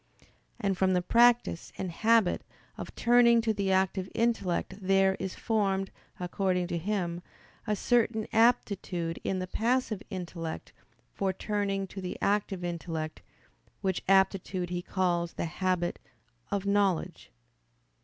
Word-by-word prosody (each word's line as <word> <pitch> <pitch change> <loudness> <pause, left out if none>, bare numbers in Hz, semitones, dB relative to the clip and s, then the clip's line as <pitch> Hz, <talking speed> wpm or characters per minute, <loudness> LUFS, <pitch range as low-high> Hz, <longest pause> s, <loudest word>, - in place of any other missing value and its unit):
And 195 -2 0
from 190 0 +2
the 180 - +2
practice 235 -5 +3
and 185 -2 -3
habit 220 +1 +3 0.3
of - - -8
turning 235 0 +5
to 220 -1 +1
the 200 -2 -1
active 190 0 +1
intellect 225 -6 0
there 195 0 +3
is 190 -1 -4
formed, 195 -4 0 0.3
according 180 0 0
to 170 - -1
him, 175 -2 -2 0.5
a 210 - +1
certain 225 -1 +1
aptitude 200 -7 +1
in 190 - -1
the 185 - -2
passive 225 +1 0
intellect 170 -3 -6 0.4
for 195 -1 0
turning 195 0 -2
to 195 +1 -8
the 180 - -5
active 200 -2 0
intellect; 165 -2 -4 0.6
which 190 -2 -1
aptitude 190 -2 +2
he 175 0 -2
calls 175 -2 -1
the - - -3
habit 180 +1 -1 0.5
of 200 -1 -2
knowledge. 200 -3 0
190 Hz, 130 wpm, -29 LUFS, 180-210 Hz, 0.6 s, turning